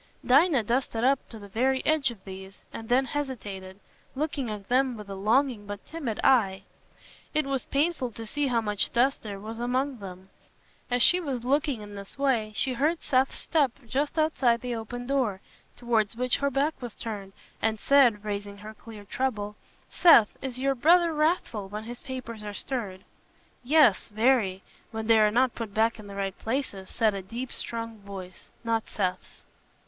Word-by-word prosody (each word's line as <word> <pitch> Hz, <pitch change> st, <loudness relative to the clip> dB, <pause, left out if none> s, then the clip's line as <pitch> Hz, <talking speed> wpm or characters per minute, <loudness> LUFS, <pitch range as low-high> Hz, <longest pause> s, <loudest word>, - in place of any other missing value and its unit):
Dinah 275 Hz, -1 st, +5 dB
dusted 235 Hz, 0 st, -1 dB
up 270 Hz, +1 st, +2 dB
to 225 Hz, -, -9 dB
the 205 Hz, -1 st, -10 dB
very 260 Hz, +6 st, 0 dB
edge 305 Hz, -4 st, +3 dB
of 225 Hz, -5 st, -11 dB
these 190 Hz, 0 st, -9 dB, 0.2 s
and 225 Hz, -, -8 dB
then 260 Hz, +2 st, +4 dB
hesitated, 205 Hz, -9 st, -5 dB, 0.4 s
looking 285 Hz, -3 st, -2 dB
at 205 Hz, -2 st, -6 dB
them 255 Hz, -1 st, +2 dB
with 210 Hz, -1 st, -10 dB
a -, -, -4 dB
longing 215 Hz, +2 st, +1 dB
but 205 Hz, -1 st, -7 dB
timid 280 Hz, -10 st, -4 dB
eye. 195 Hz, -7 st, +3 dB, 0.7 s
It 305 Hz, -1 st, +2 dB
was 275 Hz, -1 st, -2 dB
painful 285 Hz, -2 st, 0 dB
to 225 Hz, -, -7 dB
see 290 Hz, +6 st, -1 dB
how 240 Hz, -3 st, +1 dB
much 210 Hz, -2 st, -1 dB
dust 260 Hz, +4 st, +2 dB
there 200 Hz, -3 st, -6 dB
was 220 Hz, +3 st, -7 dB
among 255 Hz, +2 st, -1 dB
them. 190 Hz, -1 st, -10 dB, 0.6 s
As 245 Hz, -1 st, +3 dB
she 360 Hz, -, +7 dB
was 270 Hz, -8 st, -3 dB
looking 280 Hz, -3 st, +1 dB
in 205 Hz, 0 st, -10 dB
this 200 Hz, +3 st, -9 dB
way, 250 Hz, -6 st, +1 dB
she 260 Hz, -, 0 dB
heard 305 Hz, +7 st, 0 dB
Seth's 265 Hz, -2 st, +1 dB
step 285 Hz, -7 st, +1 dB
just 280 Hz, +7 st, -1 dB
outside 265 Hz, -7 st, +2 dB
the 250 Hz, -1 st, -3 dB
open 240 Hz, +2 st, -5 dB
door, 250 Hz, -8 st, 0 dB, 0.4 s
towards 230 Hz, -3 st, 0 dB
which 250 Hz, +1 st, +1 dB
her 280 Hz, -, +1 dB
back 280 Hz, +4 st, +1 dB
was 240 Hz, -3 st, -6 dB
turned, 200 Hz, -4 st, -6 dB, 0.3 s
and 220 Hz, -1 st, +1 dB
said, 245 Hz, -7 st, +4 dB
raising 205 Hz, -1 st, -4 dB
her 210 Hz, +2 st, -9 dB
clear 220 Hz, -1 st, -12 dB
treble, 210 Hz, -2 st, -2 dB, 0.4 s
"Seth, 275 Hz, -12 st, +6 dB
is 260 Hz, -2 st, -4 dB
your 270 Hz, +1 st, +1 dB
brother 335 Hz, +6 st, +4 dB
wrathful 305 Hz, -, 0 dB
when 210 Hz, +2 st, -5 dB
his 240 Hz, +2 st, -8 dB
papers 245 Hz, -5 st, -7 dB
are 205 Hz, -1 st, -6 dB
stirred?" 200 Hz, -8 st, -4 dB, 0.6 s
"Yes, 265 Hz, -6 st, +4 dB
very, 215 Hz, -4 st, +2 dB, 0.3 s
when 220 Hz, -1 st, -5 dB
they 225 Hz, 0 st, +5 dB
are 215 Hz, 0 st, +5 dB
not 245 Hz, +3 st, +2 dB
put 220 Hz, -4 st, -6 dB
back 225 Hz, +1 st, +2 dB
in 210 Hz, -, -10 dB
the 200 Hz, -, -9 dB
right 195 Hz, -1 st, -2 dB
places," 220 Hz, -6 st, -3 dB
said 220 Hz, -3 st, +2 dB
a 195 Hz, -, -4 dB
deep 235 Hz, +7 st, -6 dB
strong 230 Hz, -1 st, -5 dB
voice, 195 Hz, -3 st, -10 dB
not 225 Hz, -1 st, -1 dB
Seth's. 185 Hz, -3 st, -3 dB
235 Hz, 180 wpm, -27 LUFS, 210-270 Hz, 0.7 s, she